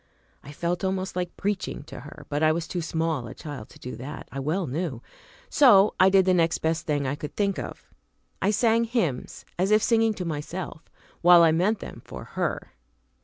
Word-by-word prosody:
I 140 - -11
felt 175 +5 -2
almost 190 -1 -2
like 180 -1 -3
preaching 195 -6 -2
to 150 - -10
her, 145 +5 -11
but 145 +1 -2
I 155 0 +5
was 165 0 -2
too 175 - -3
small 160 -5 -2
a - - -9
child 145 -8 -8
to - - -15
do 125 - -7
that, 130 +4 -8
I 135 - -5
well 160 +7 -1
knew; 140 -3 -3 0.4
so 210 -8 +6
I 190 - +7
did 190 -1 +5
the 185 - +4
next 165 -2 +2
best 160 +1 -1
thing 145 -2 0
I 130 - -1
could 145 0 -7
think 200 -2 0
of - - -8 0.5
I 195 - +2
sang 230 +2 +3
hymns 220 - -2
as 190 +2 +2
if 215 +1 +4
singing 225 -2 +3
to 180 - -4
myself, 160 +2 -5 0.3
while 175 0 +8
I 165 - +6
meant 190 +7 +1
them - - -8
for - - -9
her. - - -3
170 Hz, 205 wpm, -26 LUFS, 150-195 Hz, 0.5 s, while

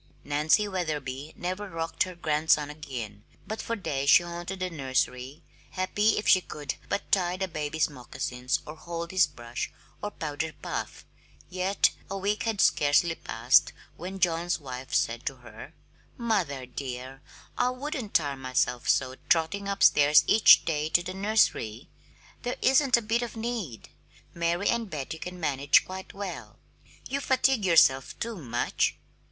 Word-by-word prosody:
Nancy 155 +8 +2
Wetherby 150 -6 -4
never 185 +3 -4
rocked 165 -1 -5
her 185 -1 -9
grandson 155 -2 +1
again, 120 -9 -7 0.2
but 220 - -4
for 230 - -3
days 140 -9 -2
she 175 - +7
haunted 175 +2 -6
the 185 0 -2
nursery, 130 -1 -2 0.3
happy 205 +3 +1
if 210 - -2
she 185 - +6
could 150 -5 -5 0.2
but 200 - -3
tie 180 -2 +2
the 190 0 -2
baby's 155 -2 -1
moccasins 125 -1 -3
or 150 - -8
hold 170 +1 -6
his 185 -4 +4
brush 120 -4 -6 0.3
or 205 - -2
powder 155 -3 -4
puff; - - -5 0.5
yet 185 +2 +2 0.2
a 195 - -3
week 205 +2 -1
had 225 -3 -1
scarcely 145 +3 +3
passed 115 -4 +2 0.2
when 185 +3 -7
John's 170 -1 +1
wife 130 -2 -8
said 115 +1 0
to 135 - -2
her: 120 +4 -12 0.4
"Mother, 185 - -1
dear, 130 +1 -7 0.3
I 245 - +2
wouldn't 255 -4 -5
tire 145 -4 +2
myself 130 -2 -1
so 130 0 +1
trotting 175 +5 +1
upstairs 150 -6 +5
each 215 -1 +7
day 155 -1 -1
to 175 +2 +3
the 185 +1 -5
nursery. 190 - 0 0.5
There 245 0 -3
isn't 265 -1 +5
a 235 - -3
bit 225 +3 0
of 235 -1 -5
need 220 - -4 0.4
Mary 170 +3 0
and 230 -3 0
Betty 155 0 -5
can 180 +1 -7
manage 145 -2 +3
quite 190 0 -8
well. 195 -2 -7 0.5
You 275 +2 -2
fatigue 265 -4 +2
yourself 135 -7 +4
too 230 0 -3
much!" 120 -7 -1
165 Hz, 150 wpm, -27 LUFS, 140-195 Hz, 0.5 s, she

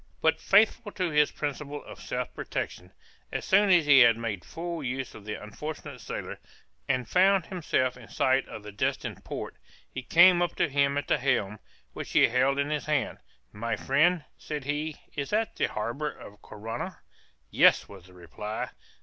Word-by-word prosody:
But, - - +2
faithful 210 +2 +3
to 180 -3 -1
his 150 -1 +4
principles 145 0 -5
of - - -11
self - - -4
protection, 90 +1 -5 0.4
as - - -3
soon 200 +1 +4
as 175 -4 +5
he 145 -2 +7
had 120 -2 +7
made 105 -6 -4
full 170 -1 -5
use 130 0 -3
of 105 - -12
the 105 - -4
unfortunate 145 +3 -7
sailor, - - -6 0.5
and 125 -2 0
found 190 - +4
himself 140 -9 -1
in 120 -3 -13
sight 130 0 +1
of 105 - -9
the 105 - -8
destined 100 - -2
port, - - -6 0.3
he 130 - -5
came 175 +6 +6
up 175 -1 0
to - - +2
him 140 0 +2
at 145 - -2
the - - +2
helm, 115 -6 0 0.3
which - - -7
he - - +6
held 130 +3 +2
in 140 +1 0
his 150 0 -2
hand, 150 -3 0 0.3
"My 115 +3 -2
friend," 155 +5 +2 0.2
said 150 -2 -5
he 150 +2 -3 0.2
"is 140 -2 -3
that 220 +1 0
the - - +1
harbor 120 +8 -3
of 105 -6 -13
Corunna?" 115 +3 -6 0.5
"Yes," - - +5
was 95 -3 -13
the 90 - -17
reply. 90 +5 -6
140 Hz, 180 wpm, -28 LUFS, 115-160 Hz, 0.5 s, he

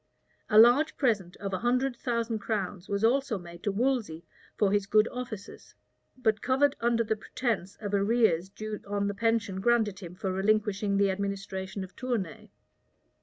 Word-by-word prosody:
A 210 - +4
large 245 +8 +6
present 205 - 0
of 195 -1 -5
a 185 - -1
hundred 250 +2 +1
thousand 230 -2 -2
crowns 200 -4 -3
was 200 +1 -1
also 255 0 +2
made 170 -1 -11
to 205 - 0
Wolsey 220 -7 -1 0.3
for 205 -2 +3
his 205 -1 +1
good 215 +2 +4
offices, 235 -5 -8 0.4
but 220 -4 +1
covered 270 +2 +2
under 235 0 +2
the 220 0 0
pretence 215 -3 -3
of 205 -2 -6
arrears 200 -4 +2
due 215 +1 -6
on 200 0 -1
the 200 - -1
pension 220 -2 0
granted 220 -3 +2
him 180 -3 -9
for 190 0 -3
relinquishing 200 0 +1
the 200 -1 +3
administration 195 0 -4
of 185 - -11
Tournay. 225 - -4
210 Hz, 165 wpm, -29 LUFS, 195-235 Hz, 0.4 s, large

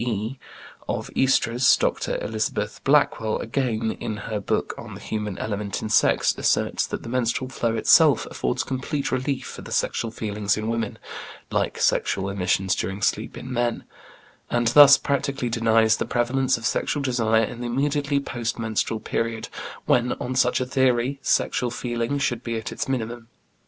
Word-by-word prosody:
e., 115 +2 -3 0.5
of - - -3
oestrus. 125 -1 +3
Dr. - - -1
Elizabeth 110 -1 -3
Blackwell, 135 -6 +2
again, 115 -2 -1
in 105 - -4
her 110 -2 -2
book 100 - -1
on - - -9
The - - -9
Human 105 -3 -4
Element 105 -2 -3
in 110 - -3
Sex, 110 - +3
asserts - - +1
that - - -5
the - - -8
menstrual 130 +2 -1
flow 115 -3 -1
itself 110 - +5
affords 60 - -1
complete 135 +2 -3
relief 130 +1 -1
for - - -8
the - - -10
sexual 115 - 0
feelings 105 -2 -2
in 110 0 -3
women 115 -2 -2 0.5
(like - - 0
sexual 95 0 +1
emissions 95 0 +1
during 95 +2 -3
sleep 110 +2 -1
in 130 +1 -7
men), 120 -1 -1 0.7
and 120 -1 +2
thus 140 +2 +9
practically 140 -2 -1
denies 115 -1 +3
the - - -2
prevalence 130 +2 +1
of 115 - -8
sexual 140 +5 0
desire 115 -4 +2
in 120 +2 -5
the 120 - -3
immediately 140 +3 0
post 120 -4 -4
menstrual 110 -1 -1
period, 115 -1 -3 0.4
when, 125 0 +2
on 125 - -4
such 125 -1 +2
a 130 - -1
theory, 130 0 +1
sexual 125 0 +1
feeling 120 +2 -2
should 120 -4 -1
be 115 -1 -2
at 110 - -5
its - - -4
minimum. 120 -2 -3
120 Hz, 165 wpm, -24 LUFS, 110-130 Hz, 0.7 s, thus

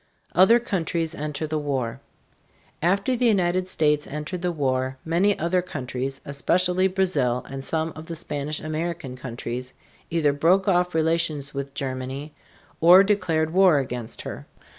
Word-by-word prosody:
OTHER 210 +6 +6
COUNTRIES 170 -7 -2
ENTER 150 +1 -4
THE 155 0 -2
WAR. 135 -6 -2 0.8
After 200 +9 +2
the 245 0 +2
United 185 -3 +2
States 150 -4 +1
entered 150 +5 -5
the 180 0 0
war, 130 -4 -1
many 180 +5 +2
other 170 +3 +1
countries, 135 -5 -4
especially 180 +6 +2
Brazil 155 -11 0
and 135 0 -6
some 160 +2 -2
of 155 +1 -9
the 170 - -5
Spanish 150 -1 -3
American 155 -3 -4
countries, 125 0 -6 0.3
either 155 -4 +2
broke 180 +7 +3
off 180 -2 +2
relations 160 -3 0
with 140 0 -5
Germany 135 +2 -4 0.5
or 180 +4 +8
declared 165 -6 +1
war 185 -4 +6
against 125 -4 -4
her. - - -7
155 Hz, 140 wpm, -24 LUFS, 140-180 Hz, 0.8 s, or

